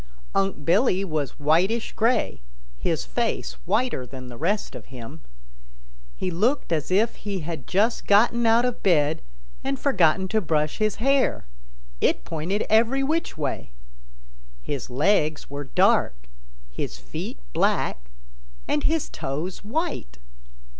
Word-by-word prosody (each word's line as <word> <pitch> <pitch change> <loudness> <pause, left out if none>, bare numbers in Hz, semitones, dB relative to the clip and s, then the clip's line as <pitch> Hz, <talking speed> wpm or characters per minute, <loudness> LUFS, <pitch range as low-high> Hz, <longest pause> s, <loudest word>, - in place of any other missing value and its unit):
Unc' 195 -7 0
Billy 195 +2 +3
was 155 -6 -2
whitish 180 +10 +2
gray, 225 - +1 0.4
his 60 - 0
face 60 -1 -1
whiter 245 - +1
than 130 0 -9
the 120 - -9
rest 190 - -1
of - - -9
him. 130 +5 -10 1.0
He 185 - -2
looked 220 +7 +1
as 155 -3 0
if 210 +5 +2
he 200 -3 -4
had 155 -5 -6
just 210 +5 +1
gotten 230 +3 +4
out 230 +2 +5
of 250 -1 -2
bed 155 -5 +3 0.4
and 270 0 -2
forgotten 190 - +3
to 220 +2 +2
brush 155 -4 0
his 215 -1 +1
hair; 275 +3 +2 0.6
it - - +2
pointed 170 +6 -2
every 230 +5 +3
which 315 - -1
way. 150 - -3 0.9
His 140 -4 -4
legs 155 +2 +1
were 145 0 -4
dark, 65 - +3 0.6
his 60 +1 -4
feet 65 +1 -6 0.2
black - - 0 0.6
and 150 - 0
his 320 -1 +1
toes 155 +9 -4
white. 225 - -3
185 Hz, 135 wpm, -25 LUFS, 145-225 Hz, 1.0 s, out